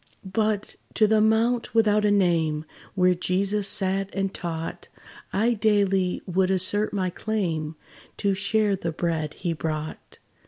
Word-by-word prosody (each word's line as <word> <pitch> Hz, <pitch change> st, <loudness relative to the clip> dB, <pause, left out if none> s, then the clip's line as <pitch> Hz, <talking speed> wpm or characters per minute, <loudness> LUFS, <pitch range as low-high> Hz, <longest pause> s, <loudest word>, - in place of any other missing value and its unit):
But, 210 Hz, +1 st, -1 dB, 0.2 s
to 220 Hz, -, +5 dB
the 215 Hz, 0 st, +3 dB
mount 230 Hz, +2 st, +1 dB
without 210 Hz, -2 st, +3 dB
a -, -, +4 dB
name, 165 Hz, -6 st, +1 dB, 0.3 s
Where 180 Hz, -1 st, +4 dB
Jesus 195 Hz, +3 st, 0 dB
sat 195 Hz, -1 st, +1 dB
and 195 Hz, -1 st, -2 dB
taught, 165 Hz, -1 st, -5 dB, 0.4 s
I 225 Hz, +5 st, +2 dB
daily 200 Hz, -4 st, +1 dB
would 185 Hz, 0 st, +1 dB
assert 190 Hz, +3 st, +2 dB
my 185 Hz, -3 st, -1 dB
claim, 170 Hz, -7 st, -2 dB, 0.4 s
To 200 Hz, -1 st, +1 dB
share 205 Hz, +1 st, +1 dB
the 170 Hz, -3 st, -3 dB
bread 160 Hz, -2 st, -2 dB
he 175 Hz, -2 st, -2 dB
brought. 155 Hz, 0 st, -5 dB
195 Hz, 140 wpm, -25 LUFS, 175-210 Hz, 0.4 s, to